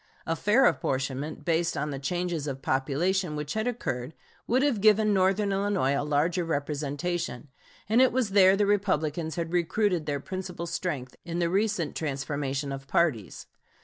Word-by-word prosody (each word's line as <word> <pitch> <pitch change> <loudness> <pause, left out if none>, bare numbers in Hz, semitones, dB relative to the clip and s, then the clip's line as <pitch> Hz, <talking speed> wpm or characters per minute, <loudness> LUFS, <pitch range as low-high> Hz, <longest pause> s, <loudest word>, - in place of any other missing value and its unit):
A 165 - 0
fair 215 - +3
apportionment, 135 - -1
based 170 0 +1
on 150 +1 -2
the 135 - -4
changes 175 +1 -2
of 135 -1 -5
population 150 +6 0
which 150 -1 -4
had 220 +2 -1
occurred, 135 - -3 0.3
would 255 +4 +2
have 265 -8 +1
given 215 0 +5
northern 195 +1 +2
Illinois 195 -8 +1
a 140 - 0
larger 150 +5 +1
representation; 150 -1 -3 0.4
and 225 +4 +4
it 260 - +5
was 240 -5 0
there 195 -1 +6
the 205 - +3
Republicans 160 -6 0
had 170 0 -3
recruited 175 -1 +1
their 145 -1 -1
principal 180 +2 -5
strength 155 -7 -4
in 170 -1 -4
the 170 -1 0
recent 200 -5 0
transformation 140 -1 -3
of 135 0 -6
parties. 135 - 0
170 Hz, 160 wpm, -27 LUFS, 145-195 Hz, 0.4 s, there